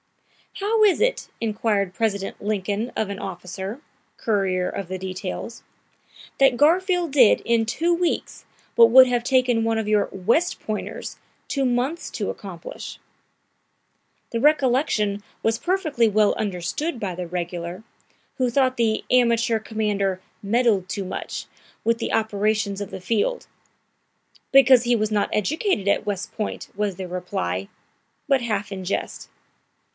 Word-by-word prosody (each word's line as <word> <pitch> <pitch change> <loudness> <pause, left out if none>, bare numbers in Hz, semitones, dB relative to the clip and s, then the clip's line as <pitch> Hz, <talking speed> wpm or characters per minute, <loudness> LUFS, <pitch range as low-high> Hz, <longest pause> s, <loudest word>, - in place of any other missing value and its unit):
"How 430 +2 +2
is 400 -5 +4
it," - - 0
inquired 210 -3 0
President 200 -3 -2
Lincoln 210 +2 -2
of 215 - -1
an 200 -1 -5
officer, 190 +4 -6 0.4
courier 190 -4 0
of 195 - -4
the 185 +1 -4
details, 185 +4 -6 0.8
"that 270 -2 +5
Garfield 350 +2 +3
did 255 -6 +6
in 230 -1 +1
two 335 +10 +1
weeks 345 0 -1 0.3
what 230 -1 +8
would 260 +2 +9
have 245 -1 0
taken 250 -3 +2
one 225 0 +1
of 220 -1 -2
your 210 -1 +2
West 235 - +1
Pointers 215 -1 -5 0.3
two 275 -2 0
months 255 +7 -1
to - - -2
accomplish?" - - -9 1.3
The 230 - -1
recollection 250 -7 +2 0.2
was 225 0 +1
perfectly 310 - +1
well 210 0 +3
understood 215 - -3
by 195 -4 -3
the 180 0 -5
regular, 175 +1 -5 0.5
who 255 -1 +1
thought 260 +1 +2
the 225 -2 +1
amateur 235 -2 +3
commander 205 -4 -1 0.2
"meddled 205 -3 +2
too 195 +1 -3
much" 185 - -5 0.4
with 230 0 +1
the - - -2
operations 210 -1 0
of 200 - -4
the 190 - -8
field. 230 - -1 1.0
"Because 265 -2 +7
he 240 0 +2
was 215 -1 0
not 205 -1 +1
educated 280 - 0
at 200 - +1
West 200 -2 -3
Point," 215 - -4
was 205 -2 -1
the 185 0 -6
reply, 95 - -3 0.6
but 275 -2 +3
half 210 -4 -2
in 190 -1 -5
jest. 185 - -4
220 Hz, 140 wpm, -23 LUFS, 195-255 Hz, 1.3 s, would